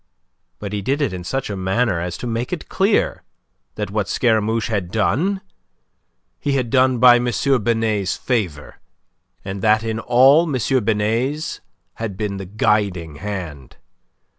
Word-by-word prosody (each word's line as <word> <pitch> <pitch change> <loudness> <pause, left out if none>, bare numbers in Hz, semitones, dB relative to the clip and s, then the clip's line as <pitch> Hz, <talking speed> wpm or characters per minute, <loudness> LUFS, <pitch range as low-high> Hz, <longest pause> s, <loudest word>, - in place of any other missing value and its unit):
But 100 -1 -6
he 105 - -2
did 135 +8 -1
it 140 -10 0
in 90 -1 -6
such 135 +4 -3
a - - -3
manner 95 +1 0
as 90 0 -4
to - - -7
make 115 +1 -3
it 180 - -4
clear 200 +2 +1 0.5
that 105 -1 -4
what 105 -2 -1
Scaramouche 110 -1 +1
had 100 -6 -2
done, 160 - 0 1.0
he 140 - -1
had 125 -4 -1
done 130 -1 +3
by 120 0 +7
M. 120 0 -1 0.3
Binet's 110 -3 0
favour, 95 - -3 0.7
and 95 0 -5
that 110 +1 +3
in 110 -1 -2
all 135 +8 +5
M. 130 -1 +1
Binet's 115 +8 -1 0.3
had 110 -4 -5
been 100 -2 -3
the 95 -1 -7
guiding 95 -6 0
hand. 85 -10 -6
110 Hz, 150 wpm, -20 LUFS, 100-125 Hz, 1.0 s, by